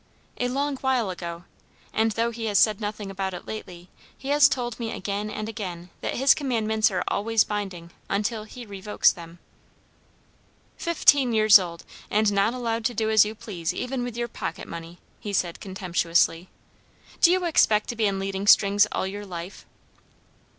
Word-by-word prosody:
"A 245 Hz, -, +1 dB
long 275 Hz, +2 st, -1 dB
while 255 Hz, -7 st, 0 dB
ago; 170 Hz, -1 st, -7 dB, 0.5 s
and 220 Hz, 0 st, +1 dB
though 230 Hz, +1 st, 0 dB
he 230 Hz, 0 st, -5 dB
has 205 Hz, -2 st, +1 dB
said 215 Hz, +1 st, +3 dB
nothing 210 Hz, -1 st, -4 dB
about 190 Hz, -1 st, -3 dB
it 175 Hz, -, -9 dB
lately, 180 Hz, -5 st, -8 dB, 0.3 s
he 270 Hz, -, -7 dB
has 290 Hz, -1 st, +6 dB
told 240 Hz, -3 st, -3 dB
me 230 Hz, -1 st, -3 dB
again 200 Hz, +2 st, -3 dB
and 215 Hz, 0 st, -5 dB
again 180 Hz, -6 st, -6 dB
that -, -, -3 dB
his 270 Hz, +3 st, +5 dB
commands 220 Hz, -6 st, +1 dB
are 185 Hz, -3 st, -1 dB
always 225 Hz, +1 st, +2 dB
binding 190 Hz, -5 st, -5 dB, 0.2 s
until 215 Hz, +2 st, -1 dB
he 240 Hz, +2 st, -10 dB
revokes 205 Hz, 0 st, +1 dB
them." 170 Hz, -1 st, -11 dB, 1.4 s
"Fifteen 290 Hz, -7 st, +3 dB
years 215 Hz, -2 st, +7 dB
old, 170 Hz, -2 st, -6 dB, 0.3 s
and 210 Hz, 0 st, +2 dB
not 200 Hz, +4 st, +2 dB
allowed 230 Hz, -2 st, -2 dB
to 245 Hz, -, 0 dB
do 220 Hz, 0 st, 0 dB
as 215 Hz, -1 st, +6 dB
you 215 Hz, +1 st, -5 dB
please 180 Hz, -5 st, -4 dB
even 250 Hz, 0 st, -3 dB
with 245 Hz, -1 st, -5 dB
your 240 Hz, 0 st, -1 dB
pocket -, -, -6 dB
money!" 170 Hz, +1 st, -8 dB, 0.2 s
he 205 Hz, -, -6 dB
said 175 Hz, -3 st, -1 dB
contemptuously. 175 Hz, -2 st, 0 dB, 0.7 s
"Do 345 Hz, -, +7 dB
you 365 Hz, 0 st, +1 dB
expect 220 Hz, -10 st, +3 dB
to 240 Hz, -, -3 dB
be 220 Hz, -2 st, +1 dB
in 195 Hz, -1 st, -1 dB
leading 195 Hz, +1 st, -3 dB
strings 205 Hz, 0 st, +6 dB
all -, -, -1 dB
your 205 Hz, +2 st, -6 dB
life?" 175 Hz, +1 st, -8 dB
210 Hz, 175 wpm, -25 LUFS, 190-235 Hz, 1.4 s, years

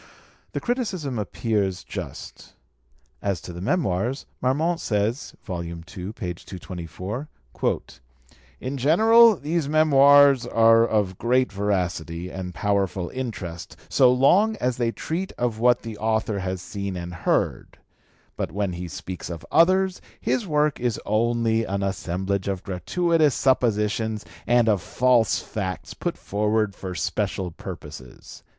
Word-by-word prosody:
The -, -, -1 dB
criticism 190 Hz, -, -2 dB
appears 100 Hz, -3 st, -1 dB
just. -, -, -8 dB, 0.7 s
As 100 Hz, -4 st, -1 dB
to 85 Hz, +2 st, -8 dB
the 85 Hz, -, -7 dB
Memoirs, 120 Hz, -, 0 dB, 0.2 s
Marmont 155 Hz, +7 st, +1 dB
says 110 Hz, +5 st, -1 dB
(ii. 85 Hz, -3 st, -4 dB
224), 90 Hz, -, -6 dB, 1.3 s
"In 135 Hz, +2 st, -4 dB
general, 220 Hz, -, +6 dB
these 155 Hz, -1 st, -2 dB
Memoirs 140 Hz, -4 st, +6 dB
are 115 Hz, 0 st, +5 dB
of 100 Hz, -5 st, 0 dB
great 125 Hz, +1 st, +2 dB
veracity 90 Hz, -4 st, -2 dB
and 95 Hz, -1 st, -5 dB
powerful 100 Hz, -3 st, 0 dB
interest 95 Hz, -, -6 dB
so 130 Hz, -2 st, +5 dB
long 185 Hz, +13 st, +4 dB
as 125 Hz, -, -1 dB
they 120 Hz, -2 st, +1 dB
treat 175 Hz, +9 st, -4 dB
of 120 Hz, -3 st, -2 dB
what 120 Hz, +1 st, +3 dB
the 110 Hz, -2 st, -7 dB
author 110 Hz, -1 st, 0 dB
has 95 Hz, -1 st, -4 dB
seen 100 Hz, +1 st, -5 dB
and 90 Hz, 0 st, -6 dB
heard; 90 Hz, -, -1 dB, 0.6 s
but -, -, -3 dB
when 100 Hz, -2 st, -1 dB
he 90 Hz, +1 st, -5 dB
speaks 90 Hz, +3 st, -7 dB
of 85 Hz, -2 st, -7 dB
others, 185 Hz, +2 st, +3 dB, 0.2 s
his 230 Hz, -5 st, -1 dB
work 150 Hz, -2 st, +1 dB
is 120 Hz, -2 st, -1 dB
only 115 Hz, +1 st, +1 dB
an 100 Hz, -1 st, -2 dB
assemblage 95 Hz, 0 st, -2 dB
of 95 Hz, -2 st, -2 dB
gratuitous 155 Hz, -, +1 dB
suppositions 110 Hz, -4 st, +1 dB, 0.2 s
and 120 Hz, 0 st, +4 dB
of 105 Hz, -4 st, +3 dB
false 125 Hz, +1 st, +2 dB
facts 95 Hz, -4 st, -5 dB
put -, -, -3 dB
forward 105 Hz, 0 st, 0 dB
for 95 Hz, -2 st, -7 dB
special 95 Hz, -2 st, -2 dB
purposes." 65 Hz, -5 st, -10 dB
110 Hz, 125 wpm, -24 LUFS, 95-135 Hz, 1.3 s, general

